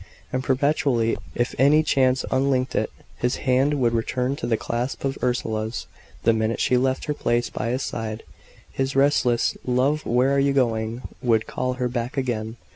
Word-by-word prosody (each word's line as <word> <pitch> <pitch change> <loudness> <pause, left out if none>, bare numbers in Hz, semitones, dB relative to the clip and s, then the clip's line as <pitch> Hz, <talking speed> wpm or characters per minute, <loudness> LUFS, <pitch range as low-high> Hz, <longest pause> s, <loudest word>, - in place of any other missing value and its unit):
And 130 0 -1
perpetually, 130 -4 +1 0.2
if 120 - 0
any 150 +4 +5
chance 130 -3 +2
unlinked 130 -1 +1
it, - - 0 0.3
his 125 +1 0
hand 135 +3 +3
would 120 -2 +2
return 125 +3 0
to 120 -3 -4
its 115 - +2
clasp 120 +4 -3
of 135 0 -1
Ursula's; 110 -2 -1 0.4
the 115 - +4
minute 110 +1 0
she 125 - +2
left 130 +1 +1
her 150 - -1
place 120 -4 0
by 115 - -3
his 130 +2 -1
side, 110 -1 -4 0.5
his 135 0 -2
restless 135 -4 +3
"Love, 130 +5 +1
where 125 +4 +2
are - - +3
you 140 0 +2
going?" 115 -2 0 0.2
would 115 -4 +2
call 130 0 -2
her 125 -1 -1
back 120 +2 -4
again. 115 -4 -2
125 Hz, 175 wpm, -24 LUFS, 115-135 Hz, 0.5 s, any